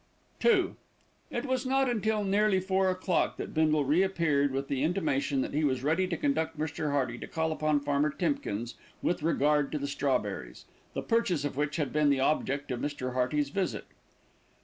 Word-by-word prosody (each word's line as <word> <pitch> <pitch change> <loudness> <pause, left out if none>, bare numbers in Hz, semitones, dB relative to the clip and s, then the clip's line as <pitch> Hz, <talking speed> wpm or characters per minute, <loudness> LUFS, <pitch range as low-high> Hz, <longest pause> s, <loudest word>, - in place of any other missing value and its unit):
II 380 -6 +4 0.6
It - - -3
was 260 -2 0
not 270 0 +2
until 220 -3 0
nearly 200 0 +3
four 190 0 +1
o'clock 185 -1 0
that - - -6
Bindle 155 -2 +2
re 150 +7 +3
appeared 165 -7 +2
with 135 +1 -2
the 135 -2 -1
intimation 145 -5 0
that - - -3
he 150 +2 +1
was 130 -3 +1
ready 165 +6 +2
to 175 -2 -2
conduct 160 +3 0
Mr. 155 0 -2
Hearty 130 -4 -1
to - - -7
call 160 0 -1
upon 155 -1 +1
Farmer 145 +1 +1
Timkins 130 - -2 0.3
with 175 - 0
regard 150 -2 +2
to - - 0
the 140 - -3
strawberries, 125 - -2 0.3
the - - -2
purchase 185 -10 +1
of 145 - -3
which 145 +1 -1
had 145 -6 -2
been 150 -1 +3
the 140 -1 +2
object 140 0 0
of 125 - -2
Mr. 130 -3 -3
Hearty's 135 +3 0
visit. 185 +3 -2
150 Hz, 185 wpm, -29 LUFS, 140-185 Hz, 0.6 s, II